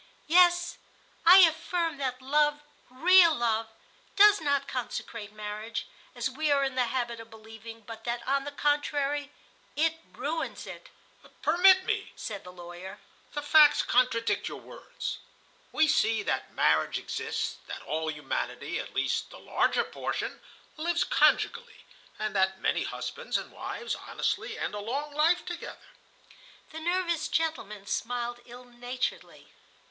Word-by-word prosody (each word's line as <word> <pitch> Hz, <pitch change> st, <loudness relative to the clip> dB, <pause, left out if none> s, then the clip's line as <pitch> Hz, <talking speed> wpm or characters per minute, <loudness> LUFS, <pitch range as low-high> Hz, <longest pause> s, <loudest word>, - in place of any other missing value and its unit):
"Yes, 350 Hz, +1 st, +4 dB, 0.5 s
I 370 Hz, +2 st, +11 dB
affirm 330 Hz, 0 st, -2 dB
that 260 Hz, -2 st, -3 dB
love, 295 Hz, +2 st, +2 dB, 0.3 s
real 335 Hz, +5 st, +6 dB
love, 225 Hz, -2 st, 0 dB, 0.5 s
does 410 Hz, -2 st, +7 dB
not 285 Hz, -2 st, +1 dB
consecrate 230 Hz, -4 st, -5 dB
marriage, 215 Hz, +2 st, -5 dB, 0.3 s
as 240 Hz, 0 st, -1 dB
we 300 Hz, +4 st, -2 dB
are 280 Hz, -1 st, +3 dB
in 270 Hz, -1 st, -1 dB
the 255 Hz, -1 st, +1 dB
habit 235 Hz, -2 st, -2 dB
of 225 Hz, 0 st, -11 dB
believing, 225 Hz, +1 st, -11 dB
but 225 Hz, +1 st, -10 dB
that, 235 Hz, 0 st, -3 dB
on 275 Hz, +1 st, +1 dB
the 290 Hz, -, -6 dB
contrary, 290 Hz, 0 st, 0 dB, 0.4 s
it 325 Hz, +2 st, +1 dB
ruins 315 Hz, +4 st, -4 dB
it." -, -, -10 dB, 0.5 s
"Permit 370 Hz, +4 st, +6 dB
me," 435 Hz, -2 st, -2 dB
said 205 Hz, -4 st, -6 dB
the 180 Hz, -, -10 dB
lawyer. 175 Hz, +1 st, -10 dB, 0.3 s
"The 295 Hz, -, -3 dB
facts 295 Hz, 0 st, +6 dB
contradict 245 Hz, -2 st, +1 dB
your -, -, -6 dB
words. -, -, -7 dB, 0.5 s
We 315 Hz, -, +3 dB
see 225 Hz, -7 st, +2 dB
that -, -, -2 dB
marriage 80 Hz, 0 st, +2 dB
exists, -, -, -3 dB
that -, -, -7 dB
all 160 Hz, +1 st, -2 dB
humanity—at 150 Hz, -1 st, -4 dB
least -, -, 0 dB
the -, -, -12 dB
larger -, -, +1 dB
portion—lives 335 Hz, +2 st, -4 dB
conjugally, 480 Hz, +1 st, +1 dB, 0.3 s
and 215 Hz, -1 st, -3 dB
that 190 Hz, 0 st, +2 dB
many -, -, 0 dB
husbands 485 Hz, +1 st, -3 dB
and -, -, -7 dB
wives 465 Hz, -, -5 dB
honestly -, -, -3 dB
end -, -, -3 dB
a 210 Hz, -, -4 dB
long 275 Hz, +8 st, -4 dB
life 320 Hz, +4 st, +2 dB
together." 350 Hz, -1 st, -8 dB, 0.8 s
The 320 Hz, -, -7 dB
nervous 345 Hz, 0 st, 0 dB
gentleman 215 Hz, -12 st, -2 dB
smiled 240 Hz, +2 st, -3 dB
ill 245 Hz, +1 st, -12 dB
naturedly. 245 Hz, +1 st, -5 dB
275 Hz, 135 wpm, -28 LUFS, 225-320 Hz, 0.8 s, I